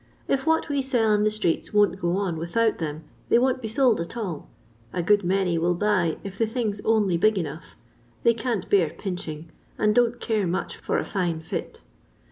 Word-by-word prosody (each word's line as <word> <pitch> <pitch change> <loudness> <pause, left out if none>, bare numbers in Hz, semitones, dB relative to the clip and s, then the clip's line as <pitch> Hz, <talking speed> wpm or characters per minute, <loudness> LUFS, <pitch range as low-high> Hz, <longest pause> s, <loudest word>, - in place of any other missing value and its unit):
If 275 +2 0
what 320 0 +2
we 285 -2 0
sell 245 -5 +2
in 210 0 +2
the - - +4
streets 210 -2 -1
won't 205 -2 +3
go 175 +1 0
on 190 -5 -1
without 210 +8 0
them 155 -1 -4 0.3
they - - +5
won't 255 +1 +2
be 225 - -4
sold 230 -3 +2
at 170 +8 -6
all. 185 -10 -5 0.4
A 175 - -2
good 205 +3 +3
many 180 -2 +1
will 175 +2 +1
buy 185 -4 +1
if 195 0 -8
the 225 - +2
thing's 215 -3 -2
only 210 -6 +2
big 215 +4 +3
enough— 160 -2 -5 0.5
'they 235 - +5
can't 230 -4 -2
bcnr 170 -5 +2
pmching, 165 -5 -5 0.3
and 210 0 +2
don't 240 0 +3 0.3
much 180 - -2
care - - -18
for - - 0
a - - -1
fine 175 -4 -1
fit. 160 - -6
200 Hz, 200 wpm, -25 LUFS, 170-225 Hz, 0.5 s, they